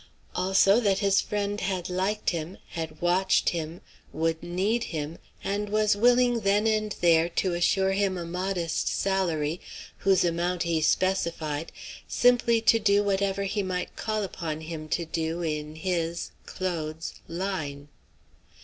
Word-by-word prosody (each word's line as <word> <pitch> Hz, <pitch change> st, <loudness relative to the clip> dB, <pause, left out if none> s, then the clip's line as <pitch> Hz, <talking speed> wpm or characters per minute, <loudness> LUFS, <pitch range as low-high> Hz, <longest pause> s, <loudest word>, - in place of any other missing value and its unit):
Also 190 Hz, +3 st, +4 dB
that 200 Hz, -5 st, +2 dB
his 200 Hz, -1 st, +3 dB
friend 205 Hz, 0 st, -2 dB
had 185 Hz, -2 st, -2 dB
liked 190 Hz, +4 st, 0 dB
him, 170 Hz, +2 st, -4 dB
had 160 Hz, -2 st, -5 dB
watched 185 Hz, +2 st, +3 dB
him, 165 Hz, 0 st, -4 dB, 0.3 s
would 160 Hz, 0 st, -1 dB
need 200 Hz, +7 st, 0 dB
him, 155 Hz, 0 st, -5 dB, 0.2 s
and 205 Hz, +1 st, -2 dB
was 215 Hz, 0 st, +3 dB
willing 245 Hz, +2 st, +4 dB
then 205 Hz, 0 st, +2 dB
and 215 Hz, -1 st, +1 dB
there 170 Hz, -1 st, +4 dB
to 180 Hz, +1 st, 0 dB
assure 190 Hz, +3 st, +2 dB
him 195 Hz, -1 st, +1 dB
a 170 Hz, -, -4 dB
modest 180 Hz, -1 st, -2 dB
salary, 175 Hz, -5 st, 0 dB, 0.4 s
whose 195 Hz, -2 st, +3 dB
amount 175 Hz, +1 st, 0 dB
he 165 Hz, -2 st, 0 dB
specified, 165 Hz, -4 st, 0 dB, 0.4 s
simply 240 Hz, -2 st, +3 dB
to 225 Hz, 0 st, +5 dB
do 205 Hz, -1 st, +3 dB
whatever 200 Hz, 0 st, 0 dB
he 205 Hz, +1 st, -1 dB
might 185 Hz, -2 st, -3 dB
call 215 Hz, -1 st, -2 dB
upon 160 Hz, -5 st, -4 dB
him 155 Hz, -1 st, -7 dB
to 170 Hz, -, 0 dB
do 165 Hz, +1 st, -2 dB
in 150 Hz, -1 st, -3 dB
his 170 Hz, -1 st, -2 dB, 0.2 s
(Claude's) 165 Hz, -4 st, -4 dB
"line." 165 Hz, -6 st, -4 dB
185 Hz, 140 wpm, -27 LUFS, 165-200 Hz, 0.4 s, to